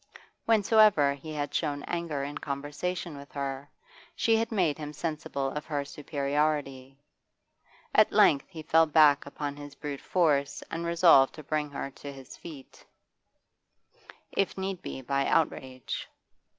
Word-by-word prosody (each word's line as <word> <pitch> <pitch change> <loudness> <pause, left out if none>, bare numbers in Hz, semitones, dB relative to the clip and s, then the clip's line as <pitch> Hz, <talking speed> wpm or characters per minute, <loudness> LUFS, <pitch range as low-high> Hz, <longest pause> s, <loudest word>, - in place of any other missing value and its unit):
Whensoever 215 -9 +5
he 145 +3 -9
had 145 -2 -3
shown 145 -3 -1
anger 170 -5 -3
in 145 +1 -5
conversation 145 +4 -4
with 140 0 -11
her, 140 0 -4 0.5
she 225 - +3
had 230 +1 0
made 175 -8 +1
him 150 -1 -6
sensible 155 -4 -3
of 150 +1 -5
her 145 -3 -2
superiority; 140 -2 -2 1.0
at - - +5
length 140 -2 +4
he 160 -4 -9
fell 160 +1 +4
back 150 -2 +5
upon 145 0 -5
his 145 -1 -10
brute 145 -2 -6
force 150 -6 +1
and 170 +1 -3
resolved 165 -6 +5
to 155 - -10
bring 150 0 -1
her 140 -1 -5
to 140 +1 -9
his 135 -1 -11
feet, 150 -6 -12 1.5
if 195 -1 -1
need 190 -1 -3
be 130 - -7
by 140 +1 0
outrage. 130 -5 -1
145 Hz, 140 wpm, -28 LUFS, 140-165 Hz, 1.5 s, Whensoever